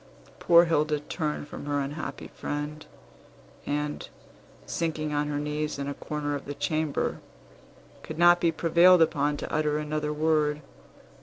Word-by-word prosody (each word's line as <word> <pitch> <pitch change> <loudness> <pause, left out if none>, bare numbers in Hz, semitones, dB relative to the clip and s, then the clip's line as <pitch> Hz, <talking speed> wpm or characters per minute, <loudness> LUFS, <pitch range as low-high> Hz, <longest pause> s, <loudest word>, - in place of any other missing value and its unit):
Poor 170 0 +6
Hilda 155 -2 +1
turned 150 0 -4
from 145 - -8
her 145 0 0
unhappy 145 +3 -5
friend, 150 +1 -5 0.8
and, 150 0 -3 0.6
sinking 155 -2 -2
on 145 0 0
her 145 -1 -2
knees 150 +1 -2
in 140 0 -4
a 140 - -2
corner 145 0 -4
of 145 - -5
the 145 - -6
chamber, 155 -2 -1 0.8
could - - -8
not 175 +1 +6
be 170 - +3
prevailed 170 +1 +5
upon 145 -2 0
to - - -6
utter 150 -1 +1
another 150 0 -2
word. 150 -1 +1
150 Hz, 145 wpm, -27 LUFS, 145-155 Hz, 0.8 s, Poor